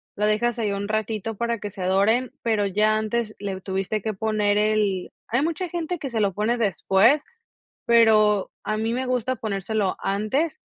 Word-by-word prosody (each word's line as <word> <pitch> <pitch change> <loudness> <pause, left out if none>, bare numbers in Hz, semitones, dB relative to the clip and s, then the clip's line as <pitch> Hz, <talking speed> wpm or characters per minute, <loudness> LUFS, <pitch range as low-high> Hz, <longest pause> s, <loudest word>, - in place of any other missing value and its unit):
lo 210 - 0
dejas 225 +3 +1
ahí 215 -3 0
un 200 0 -3
ratito 215 0 -2
para 235 +1 -2
que 205 - -5
se 190 -1 -7
doren, 205 +7 +2
pero 220 -3 +1
ya 210 +2 +2
antes 220 0 -2
le 195 -2 -4
tuviste 195 +2 -2
que 220 +2 -2
poner 210 0 0
el 210 -3 +1 0.2
hay 240 +4 +1
mucha 335 +4 -1
gente 345 0 -3
que 280 - -4
se 225 -3 -1
lo 200 -2 +1
pone 215 +5 0
después, 220 - +3 0.6
pero 215 -4 +4
a 215 - -1
mí 220 +2 -1
me 255 +2 -2
gusta 255 0 -1
ponérselo 205 -1 -1
antes. 215 +11 -1
215 Hz, 180 wpm, -24 LUFS, 205-235 Hz, 0.6 s, pero